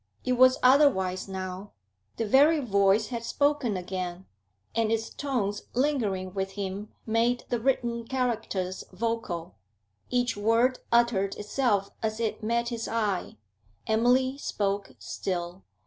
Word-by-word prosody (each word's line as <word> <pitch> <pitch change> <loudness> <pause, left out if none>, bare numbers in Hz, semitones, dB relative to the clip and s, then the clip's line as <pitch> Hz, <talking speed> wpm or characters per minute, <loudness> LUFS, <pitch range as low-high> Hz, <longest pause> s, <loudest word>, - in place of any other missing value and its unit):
It 255 - +2
was 255 +1 +6
otherwise 250 -10 +4
now. 190 +1 -6 0.4
The 225 - 0
very 290 +8 +5
voice 200 -3 +2
had 235 -2 -4
spoken 285 -4 +1
again, 180 0 -5 0.5
and 225 -1 +1
its 225 0 -1
tones 215 -8 -2
lingering 215 -10 0
with 195 0 -3
him 200 +1 -5
made 235 +2 +1
the 240 - 0
written 235 -2 0
characters 225 -8 -2
vocal; 220 -7 -3 0.6
each 245 -1 +1
word 230 +5 +2
uttered 235 -5 +3
itself 210 -2 0
as 220 0 -2
it 225 -1 -2
met 235 +2 0
his 230 -2 -4
eye; 210 -5 -1 0.5
Emily 250 +4 +2
spoke 200 -5 -2
still. 180 0 -4
225 Hz, 125 wpm, -28 LUFS, 195-245 Hz, 0.6 s, was